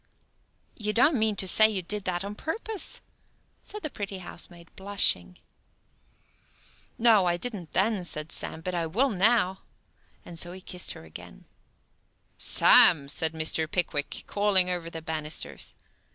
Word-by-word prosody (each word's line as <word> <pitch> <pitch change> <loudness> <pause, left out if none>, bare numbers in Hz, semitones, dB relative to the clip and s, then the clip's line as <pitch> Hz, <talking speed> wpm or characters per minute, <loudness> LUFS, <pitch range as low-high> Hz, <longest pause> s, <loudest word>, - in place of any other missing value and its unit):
"You 210 -1 -3
don't 290 +8 +4
mean 215 -1 +1
to 190 - -3
say 215 +4 +5
you 195 -4 -3
did 205 +3 -4
that 180 +1 -2
on 200 - -6
purpose?" 415 - -3 0.6
said 420 0 -9
the 310 - -3
pretty 200 -1 -6
housemaid, 175 -1 -7
blushing. 190 - +1 1.6
"No, 220 -5 +4
I 175 0 0
didn't 200 -6 -8
then," 200 0 +1
said 155 -2 -4
Sam, 160 - -2
"but 185 +2 -5
I 170 -2 -2
vill 245 +11 +1
now." 200 -1 +1 0.7
So 175 +1 -2
he 190 - -11
kissed 180 -1 -1
her 80 - -13
again. 80 - -12 0.9
"Sam!" 140 -4 +6
said 160 +2 +1
Mr. 160 0 -2
Pickwick, 155 -5 -2
calling 200 -3 +3
over 175 -2 -4
the 165 -1 -8
banisters. 155 -1 -3
185 Hz, 140 wpm, -26 LUFS, 165-210 Hz, 1.6 s, Sam